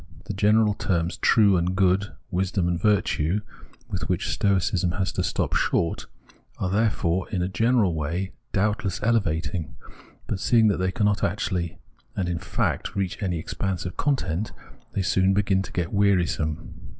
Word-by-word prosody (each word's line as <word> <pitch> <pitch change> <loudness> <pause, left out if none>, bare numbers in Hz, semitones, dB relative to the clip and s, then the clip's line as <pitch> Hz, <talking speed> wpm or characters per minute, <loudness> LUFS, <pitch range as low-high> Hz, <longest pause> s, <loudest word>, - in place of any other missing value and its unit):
The - - -4
general 105 +2 +3
terms 90 -4 -1
true 100 -4 +4
and 90 +2 0
good, 95 +1 +2 0.2
wisdom 95 0 0
and 85 -1 -1
virtue, 100 -3 +1 0.5
with 95 -6 -4
which 90 -2 0
Stoicism 95 -3 +1
has 95 -2 -1
to - - -1
stop - - -1
short, 85 - 0 0.5
are, 90 - -2
therefore, 95 -4 +1
in 90 -2 -1
a - - 0
general 110 0 +2
way, 85 +5 -2 0.2
doubtless 105 -2 0
elevating; 90 -7 0 0.5
but - - -3
seeing 110 +4 +4
that 100 - +1
they 95 0 0
cannot 105 0 +1
actually 90 -2 -1 0.4
and 95 - -1
in 85 -2 -2
fact - - -2
reach 95 +1 -2
any 90 -4 -1
expanse 90 +3 -3
of 90 - -5
content, 105 - -1 0.4
they 100 - 0
soon 95 +1 +2
begin 100 -2 +2
to 95 - -7
get 85 -2 -2
wearisome. 90 -6 0
95 Hz, 155 wpm, -25 LUFS, 85-105 Hz, 0.5 s, true